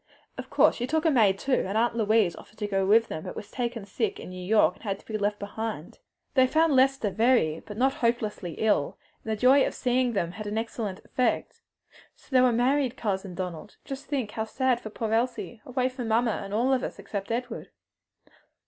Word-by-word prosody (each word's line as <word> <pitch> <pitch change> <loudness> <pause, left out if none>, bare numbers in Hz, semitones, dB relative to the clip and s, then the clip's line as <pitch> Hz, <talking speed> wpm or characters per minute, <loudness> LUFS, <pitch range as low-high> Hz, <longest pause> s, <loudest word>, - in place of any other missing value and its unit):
"Of - - -8
course - - +4
she 245 - -2
took 315 +3 0
a 320 - +5
maid 210 -8 +4
too, 260 +5 +1
and 200 +3 -1
Aunt 235 +1 +2
Louise 215 -5 +2
offered 215 - -15
to 210 - -3
go 195 -1 0
with 225 +3 +5
them, 155 - -5
but - - -7
was 205 - -8
taken 235 -4 -3
sick 405 - -2
in - - -8
New 185 0 -7
York, 210 +4 +3
so - - -22
had 200 -3 -2
to - - -21
be 220 - -5
left 205 0 0
behind. 205 - -6 0.3
"They 260 -1 +5
found 315 +1 +3
Lester 265 -5 +3
very 220 -9 +2
but 210 -1 -10
not 265 +3 +3
hopelessly 215 -7 -1
ill, 210 -10 +1 0.3
and 220 - -4
the - - +1
joy 265 +3 +6
of - - -2
seeing 250 -1 +1
them 170 -5 -1
had 215 +3 -7
an 210 +1 -3
excellent 225 -3 -4
effect. 255 - -1 0.5
So - - -24
they 255 -1 +5
were 250 -1 +5
married, 255 +2 +1
Cousin 190 -4 -3
Donald. 180 +1 -6
Just 270 0 -7
think 260 -8 -2
how 220 0 -3
sad 255 +2 0
for 215 - -7
poor 220 +1 -3
Elsie! 235 -1 -1
away 255 0 0
from 255 -2 -5
mamma 230 +1 +2
and 195 - -8
all 240 +6 +2
of 260 - +1
us - - -5
except 200 0 -5
Edward!" 240 0 -4
225 Hz, 220 wpm, -27 LUFS, 205-255 Hz, 0.5 s, joy